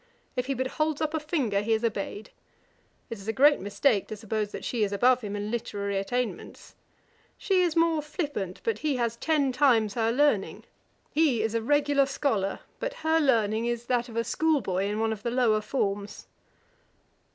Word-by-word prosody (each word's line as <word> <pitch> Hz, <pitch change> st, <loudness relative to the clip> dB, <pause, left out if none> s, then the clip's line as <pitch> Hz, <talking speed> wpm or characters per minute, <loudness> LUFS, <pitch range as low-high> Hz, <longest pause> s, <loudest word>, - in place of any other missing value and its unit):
If 250 Hz, 0 st, -2 dB
he 275 Hz, -, -1 dB
but 260 Hz, +1 st, -1 dB
holds 305 Hz, +2 st, -1 dB
up 310 Hz, 0 st, -1 dB
a 315 Hz, -, 0 dB
finger, 275 Hz, -10 st, 0 dB
he 225 Hz, +2 st, 0 dB
is 220 Hz, +1 st, 0 dB
obeyed. 210 Hz, -1 st, -3 dB, 0.8 s
It 230 Hz, -, -5 dB
is 195 Hz, -, -11 dB
a -, -, +1 dB
great 285 Hz, +5 st, +5 dB
mistake 205 Hz, +2 st, +1 dB
to 215 Hz, -, -6 dB
suppose 215 Hz, -1 st, -3 dB
that -, -, -7 dB
she 235 Hz, -3 st, 0 dB
is 200 Hz, -, 0 dB
above 245 Hz, +5 st, +3 dB
him 205 Hz, -2 st, -5 dB
in 205 Hz, +1 st, -4 dB
literary 200 Hz, -4 st, -2 dB
attainments. 245 Hz, +5 st, -4 dB, 0.6 s
She 380 Hz, -2 st, +2 dB
is 345 Hz, -3 st, +1 dB
more 330 Hz, -2 st, +3 dB
flippant; 290 Hz, -, -4 dB
but 455 Hz, -, -1 dB
he 300 Hz, -3 st, 0 dB
has 235 Hz, -2 st, -1 dB
ten 295 Hz, -3 st, +1 dB
times 245 Hz, -6 st, +3 dB
her 225 Hz, -1 st, +1 dB
learning: 270 Hz, -5 st, +1 dB, 0.5 s
he 285 Hz, -8 st, +2 dB
is 220 Hz, 0 st, -1 dB
a 230 Hz, -, 0 dB
regular 285 Hz, +2 st, +2 dB
scholar; 215 Hz, -10 st, -1 dB, 0.2 s
but -, -, -3 dB
her 320 Hz, 0 st, +4 dB
learning 230 Hz, -5 st, +2 dB
is 240 Hz, 0 st, -2 dB
that 245 Hz, 0 st, 0 dB
of 225 Hz, -, -10 dB
a 230 Hz, -, +1 dB
school 315 Hz, +4 st, +1 dB
boy 190 Hz, -4 st, -1 dB
in 210 Hz, +1 st, -2 dB
one 225 Hz, 0 st, +1 dB
of 210 Hz, -, -9 dB
the 235 Hz, -, -2 dB
lower 235 Hz, -3 st, +2 dB
forms.' 205 Hz, -3 st, -3 dB
235 Hz, 195 wpm, -27 LUFS, 210-290 Hz, 0.8 s, great